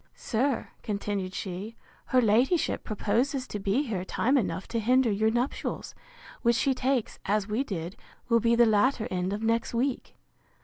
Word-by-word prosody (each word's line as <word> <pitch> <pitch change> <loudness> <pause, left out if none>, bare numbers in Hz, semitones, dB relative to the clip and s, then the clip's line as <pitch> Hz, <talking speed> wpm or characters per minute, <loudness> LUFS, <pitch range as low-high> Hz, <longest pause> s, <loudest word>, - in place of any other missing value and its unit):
Sir, 255 +3 -1
continued 200 -2 -3
she, 195 +4 -5 0.3
her 255 -1 +3
ladyship, 245 - +2
proposes 240 +6 0
to 210 - -5
be 205 +8 +1
here 210 -9 -3
time 255 +7 +1
enough 185 -8 -1
to 230 - -1
hinder 250 +1 +3
your 215 +2 +2
nuptials, 240 +4 -2 0.5
which 235 -1 +3
she 270 +3 +2
takes, 255 -2 -1
as 205 0 +1
we 220 +5 0
did, 180 -7 -5 0.3
will 230 -1 +4
be 230 +1 +3
the 235 0 +6
latter 220 +2 +2
end 185 0 -1
of 210 +2 -3
next 230 +2 0
week. 255 +2 -1
225 Hz, 165 wpm, -28 LUFS, 205-255 Hz, 0.5 s, the